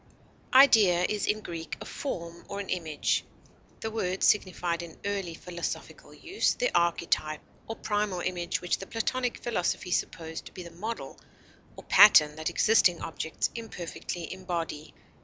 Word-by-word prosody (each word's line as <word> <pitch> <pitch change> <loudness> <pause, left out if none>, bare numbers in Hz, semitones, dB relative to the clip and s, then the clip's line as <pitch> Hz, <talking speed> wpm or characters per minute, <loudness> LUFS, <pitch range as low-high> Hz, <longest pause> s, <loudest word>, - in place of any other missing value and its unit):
Idea 210 -10 +7
is 210 -1 -2
in 215 +1 +1
Greek 165 -4 -6
a - - -8
form 170 -10 -5
or 200 - -4
an 200 - -6
image. 160 -5 0 0.6
The 220 - -3
word 190 -4 -2
signified 180 -4 +2
in 170 -2 -10
early 195 -4 -2
philosophical 170 0 -6
use 370 +4 -1
the - - 0
archetype 165 -2 +1 0.3
or 225 - -4
primal 205 -5 -1
image 175 -1 -2
which 175 - 0
the 195 - -8
Platonic 245 +2 -2
philosophy 190 -4 -1
supposed 160 -2 -3
to - - -13
be 180 - -8
the 170 - -10
model 215 +7 -6 0.6
or - - -11
pattern 160 -7 +7
that 155 - -1
existing 190 -6 +4
objects 160 0 -3
imperfectly 175 -6 -6
embody. 170 -5 -5
180 Hz, 145 wpm, -28 LUFS, 170-210 Hz, 0.6 s, Idea